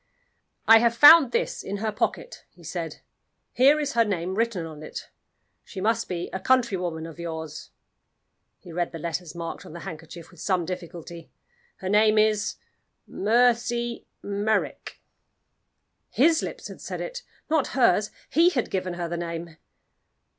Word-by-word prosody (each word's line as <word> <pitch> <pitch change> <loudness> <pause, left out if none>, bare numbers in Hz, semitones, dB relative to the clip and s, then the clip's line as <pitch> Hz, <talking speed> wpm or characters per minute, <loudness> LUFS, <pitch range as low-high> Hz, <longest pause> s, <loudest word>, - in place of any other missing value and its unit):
"I 225 0 +9
have 235 0 +2
found 290 -2 +9
this - - -1
in 200 +1 -5
her 215 +1 -2
pocket," - - -3
he - - -20
said. - - -5 0.5
"Here 275 +5 +5
is 290 -2 -2
her 235 - +4
name 185 -4 -2
written 215 -5 -1
on 155 -2 -9
it. - - -8 0.5
She 195 - -9
must 225 +3 0
be 175 -1 -3
a 190 - -2
countrywoman 185 -9 0
of 165 0 -10
yours." 160 -2 -6 0.9
He 175 - -13
read 175 +1 -2
the - - -5
letters 170 +1 -5
marked 170 -1 -6
on - - -12
the 170 - -8
handkerchief 165 -1 -9
with 175 - -18
some 185 -2 0
difficulty. 170 -1 -8 0.5
"Her 190 - -3
name 215 +1 +4
is 215 -1 +2 0.5
Mercy 235 +2 +1 0.2
Merrick." 205 +1 -2 1.1
His 320 +5 +3
lips - - -6
had - - -11
said - - -5
it - - -5 0.3
not 310 -3 +1
hers! 210 -4 +4 0.2
He 335 +4 +5
had 255 -9 -2
given 185 -2 -2
her 175 -1 -3
the 170 +1 -4
name. 170 -1 -6
195 Hz, 155 wpm, -25 LUFS, 170-235 Hz, 1.1 s, I